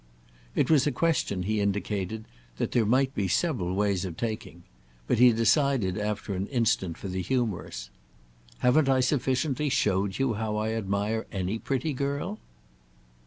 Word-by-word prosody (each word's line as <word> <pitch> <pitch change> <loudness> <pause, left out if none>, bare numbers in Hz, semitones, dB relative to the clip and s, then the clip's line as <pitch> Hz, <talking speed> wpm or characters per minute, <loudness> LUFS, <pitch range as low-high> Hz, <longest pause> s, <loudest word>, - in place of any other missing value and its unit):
It - - +2
was 150 -3 +5
a - - +2
question, 125 - 0
he 105 +2 0
indicated, 100 +1 -2 0.3
that - - -1
there 115 -3 +2
might 130 +3 +2
be 100 -6 -1
several 95 - 0
ways 100 -2 +1
of 90 -4 -5
taking; 110 -6 -4 0.4
but - - +1
he 125 0 +8
decided 115 -3 +2
after 105 -1 -2
an 95 +2 -2
instant 110 - 0
for - - -7
the 95 0 -2
humorous. 110 -6 -2 0.7
"Haven't 135 +3 +4
I 130 -1 +4
sufficiently 135 +2 +1
showed 100 -5 +1
you 135 -3 +1
how 105 0 -2
I 110 +1 -1
admire 105 +1 -1
any 95 +2 -2
pretty 140 +5 -1
girl?" 140 -4 -2
110 Hz, 155 wpm, -27 LUFS, 100-130 Hz, 0.7 s, he